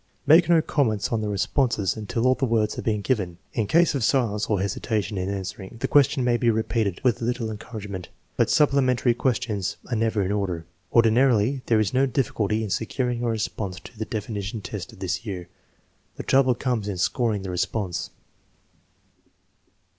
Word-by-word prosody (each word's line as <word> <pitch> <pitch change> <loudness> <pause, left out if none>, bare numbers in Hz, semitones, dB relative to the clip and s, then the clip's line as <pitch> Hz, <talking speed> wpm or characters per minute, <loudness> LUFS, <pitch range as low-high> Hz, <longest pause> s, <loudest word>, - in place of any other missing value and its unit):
Make 165 +2 +6
no 165 -2 +5
comments 110 -11 0
on 115 -2 0
the 105 - -2
responses 105 0 0
until 115 +2 -2
all 130 - +5
the 135 - -4
words 110 -2 +1
have - - -6
been 105 -2 0
given. 95 -9 -1 0.2
In 110 -3 0
case 170 +7 +4
of 135 -4 -1
silence 110 -5 +1
or 105 -3 +1
hesitation 100 +1 -2
in 95 0 -2
answer 100 0 -4
ing, 95 +4 -10
the - - -1
question 140 -1 +4
may 120 -1 +2
be 120 0 +2
repeated 110 -3 0
with 120 -5 +2
a - - -1
little 120 -2 -1
encourage 105 0 -7
ment; 95 -3 -6 0.3
but - - +2
supplementary 130 -4 +3
questions 110 -6 -1
are - - +1
never 110 -2 +1
in 95 - -1
order. 95 -5 -2 0.3
Ordinarily 120 +2 +3
there 115 -2 +4
is 105 0 0
no 135 +2 +3
difficulty 110 -4 0
in 105 - -4
securing 120 +4 -1
a - - 0
response 105 -4 -3
to - - -13
the 110 - -2
definition 105 -1 -4
test - - -6
of - - -15
this - - -3
year. 90 -5 -6 0.7
The - - -6
trouble 130 -2 +3
comes 120 -6 -1
in 100 - -2
scor 105 +5 +1
ing 100 - -5
the 95 - -4
response. 95 0 -2
110 Hz, 190 wpm, -24 LUFS, 100-125 Hz, 0.7 s, Make